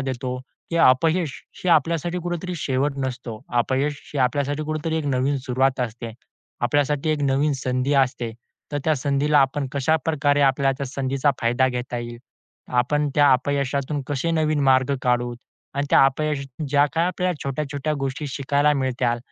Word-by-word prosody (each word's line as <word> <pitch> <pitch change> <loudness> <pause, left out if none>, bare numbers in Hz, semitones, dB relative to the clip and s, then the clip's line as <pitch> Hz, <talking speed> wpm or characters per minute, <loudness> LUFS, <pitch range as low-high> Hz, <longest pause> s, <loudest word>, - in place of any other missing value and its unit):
देतो, 130 -1 -3 0.3
की 170 - -1
अपयश 160 +1 +3 0.3
हे 185 - +1
आपल्यासाठी 170 +3 +2
कुठेतरी 175 +1 -3
शेवट 140 0 0
नसतो. 120 -4 -6 0.2
अपयश 140 +4 0
ही 145 - -1
आपल्यासाठी 145 +3 0
कुठेतरी 155 +1 -2
एक 155 - -3
नवीन 135 +1 +1
सुरुवात 130 +1 +1
असते. 115 -1 -4 0.5
आपल्यासाठी 145 +4 +1
एक 150 -2 0
नवीन 140 +2 +2
संधी 130 +2 -1
असते. 125 -4 +1 0.4
तर 145 - 0
त्या 155 -1 +3
संधीला 145 +2 +2
आपण 135 +1 +2
कशाप्रकारे 145 0 +1
आपल्याला 135 0 +3
त्या 140 - -3
संधीचा 135 +2 0
फायदा 120 +3 +2
घेता 125 -1 -4
येईल. 120 0 -7 0.5
आपण 145 +4 +1
त्या 145 -1 +5
अपयशातून 140 +2 0
कसे 145 +4 -1
नवीन 155 -2 +1
मार्ग 130 +1 +3
काढूत 120 -1 0 0.4
आणि 140 +1 -1
त्या - - +7
अपयशातून 145 0 -3
ज्या 145 +1 +4
काही 165 +2 +1
आपल्याला 180 0 -1
छोट्या-छोट्या 145 +2 -2
गोष्टी 135 +2 -3
शिकायला 140 +2 +1
मिळतील. 125 -3 0
140 Hz, 150 wpm, -23 LUFS, 130-150 Hz, 0.5 s, त्या